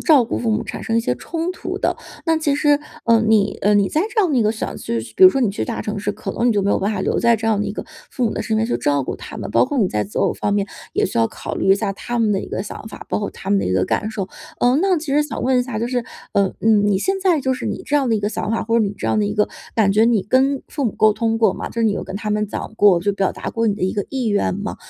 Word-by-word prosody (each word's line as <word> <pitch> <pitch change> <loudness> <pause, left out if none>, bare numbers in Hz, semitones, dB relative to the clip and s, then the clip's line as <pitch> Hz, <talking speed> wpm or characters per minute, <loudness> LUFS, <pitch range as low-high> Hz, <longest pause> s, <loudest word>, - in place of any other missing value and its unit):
照 290 -7 +5
顾 - - -3
父 230 - -1
母 220 +1 0
产 - - -6
生 225 - -1
一 - - +4
些 125 - -1
冲 330 - -4
突 - - -5
的。 - - 0 0.3
那 325 -1 +2
其 310 -3 +1
实， 290 -1 +3 0.2
呃， 230 -1 +4
你 210 -2 +3
呃， 205 +1 +4
你 200 -1 +3
在 310 - 0
这 440 - +2
样 360 -6 +1
的 265 - +2
一 235 - +4
个 215 - +2
想 220 - -4
去 115 - -3 0.2
比 - - +1
如 185 - +12
说 270 - -1
你 235 - +3
去 195 - -3
大 235 - -4
城 210 0 -4
市， 205 +1 -1
可 210 +1 -6
能 240 +1 +1
你 - - +4
就 200 -2 +1
没 200 - +1
有 - - +1
办 205 +3 0
法 190 - -2
留 - - 0
在 235 -1 +4
这 225 +1 -4
样 215 -2 +2
的 - - -1
一 - - -3
个 - - -6 0.3
父 250 - -1
母 220 - +1
的 - - -2
身 220 - -1
边 225 - +1
去 240 - 0
照 145 -2 0
顾 - - -3
他 - - -9
们， - - -5
包 - - +5
括 290 -3 -2
你 200 - +3
在 105 -10 -1
择 100 - -5
偶 - - +2
方 205 - -2
面 200 -1 +1 0.3
也 - - +2
需 - - -6
要 115 -1 +3
考 - - -6
虑 - - -1
一 195 - +6
下 200 -1 -2
他 240 +4 -4
们 220 -2 +2
的 195 - 0
一 - - -7
个 - - -3
想 215 - -8
法， - - -10
包 - - -1
括 205 - -3
他 195 - -7
们 200 -1 +3
的 - - -2
一 - - 0
个 95 0 +2
感 215 - -1
受。 200 -4 -4 0.3
呃， 245 +2 +3
那 380 -3 +3
其 300 -3 -4
实 300 - +4
想 300 - -5
问 255 0 +3
一 - - +1
下 245 -4 -4
就 235 - -1
是 245 -1 -1 0.3
呃， 200 -1 +2
嗯， 215 -2 +4
你 195 -2 +2
现 385 - -1
在 355 -6 +2
就 260 0 0
是 255 - -5
你 - - -3
这 295 - -1
样 275 -4 +2
的 225 - +2
一 210 - -2
个 205 - 0
想 215 -1 -3
法， 225 - -1
或 230 +1 +1
者 230 - +4
你 200 - -2
这 - - -3
样 215 - +2
的 - - +1
一 205 - -2
个 210 - +2 0.3
感 200 -3 +3
觉， 215 +2 +4
你 225 -5 +2
跟 265 +4 +2
父 285 -3 -3
母 220 - 0
沟 215 -1 +4
通 225 +1 -1
过 225 - +4
吗？ - - -5
就 - - -14
是 230 - 0
你 215 - +3
有 - - -3
跟 190 +1 -6
他 210 0 -4
们 210 0 0
讲 - - -5
过 200 -5 +5
就 200 +3 0
表 195 -1 0
达 - - -5
过 230 0 0
你 205 - +2
的 - - -7
一 185 - +1
个 205 - -2
意 260 -3 -2
愿 205 -2 +1
吗？ 205 +2 -4
220 Hz, 370 characters per minute, -20 LUFS, 205-250 Hz, 0.3 s, 如